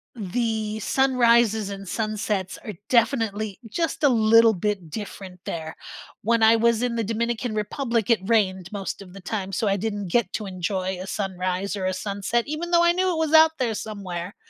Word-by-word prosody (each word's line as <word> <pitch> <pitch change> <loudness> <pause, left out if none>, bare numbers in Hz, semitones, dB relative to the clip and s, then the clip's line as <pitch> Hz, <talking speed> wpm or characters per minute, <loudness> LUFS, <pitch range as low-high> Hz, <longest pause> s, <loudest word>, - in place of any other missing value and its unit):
the 220 0 -2
sunrises, 235 -4 +3
and 195 0 -7
sunsets 215 -3 -2
are 215 - -6
definitely 220 -4 +1
just 325 +8 -2
a 285 - +6
little 230 -1 +5
bit 195 -2 -2
different 195 -1 -7
there, 160 -1 -5 0.5
when 230 +1 +2
I 220 +1 +7
was 230 +1 +2
in 245 -1 0
the 230 - 0
Dominican 230 +1 -2
Republic 230 +1 -1
it 230 - +4
rained 190 -4 +1
most 200 -1 -5
of 180 -2 -12
the 195 - -10
time 195 0 -4
so 205 +3 -1
I 200 - +2
didn't 205 -1 -3
get 225 -4 +2
to 215 - -3
enjoy 185 0 -3
a 190 - -7
sunrise, 190 0 -2
or 190 -2 -3
a 185 - 0
sunset- 200 +4 -1
even 310 +4 -4
though 340 -1 +4
I 345 - +5
knew 370 +2 +1
it 340 - -2
was 320 -1 0
out 320 0 +8
there 240 -3 0
somewhere. 200 -3 -6
215 Hz, 185 wpm, -24 LUFS, 195-235 Hz, 0.5 s, out